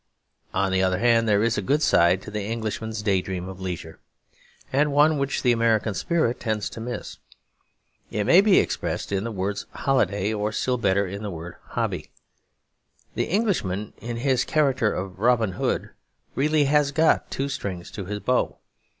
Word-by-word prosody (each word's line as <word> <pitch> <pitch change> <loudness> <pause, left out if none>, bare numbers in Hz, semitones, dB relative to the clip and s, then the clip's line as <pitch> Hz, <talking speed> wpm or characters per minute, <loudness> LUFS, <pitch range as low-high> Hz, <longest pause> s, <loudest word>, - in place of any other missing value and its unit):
On 95 0 0
the 95 0 +2
other 95 -1 +2
hand, 115 +1 +3
there 105 0 +3
is 115 -2 +1
a - - -2
good 145 +10 +1
side 90 -7 +4
to - - -8
the 105 0 -3
Englishman's 110 0 -4
day 100 -3 +2
dream 90 -1 -5
of 95 0 -9
leisure, 90 -2 -6 0.7
and 145 +2 +3
one 150 +1 +4
which 140 0 -1
the 125 - +4
American 115 -2 +2
spirit 160 - 0
tends 110 -3 -2
to 115 - -8
miss. 120 +1 -6 0.9
It 105 - -1
may 175 - +6
be 200 -2 +5
expressed - - -1
in 100 +1 -1
the 115 - -3
word 100 0 -2
'holiday' 110 -6 0
or 105 0 -1
still 125 +1 0
better 100 -2 +2
in 100 +2 -6
the 105 - -4
word 85 -1 -8
'hobby.' - - -3 1.0
The - - -1
Englishman, 155 - -1
in 115 +1 -5
his 130 0 +1
character 135 -8 +2
of 95 0 -5
Robin 115 -2 +3
Hood, 90 - -2 0.4
really 150 +3 +2
has 145 0 +3
got 160 +2 +2
two 135 - -2
strings 95 -10 -5
to 100 - -6
his 105 +2 -4
bow. 125 +6 0
110 Hz, 175 wpm, -24 LUFS, 100-135 Hz, 1.0 s, may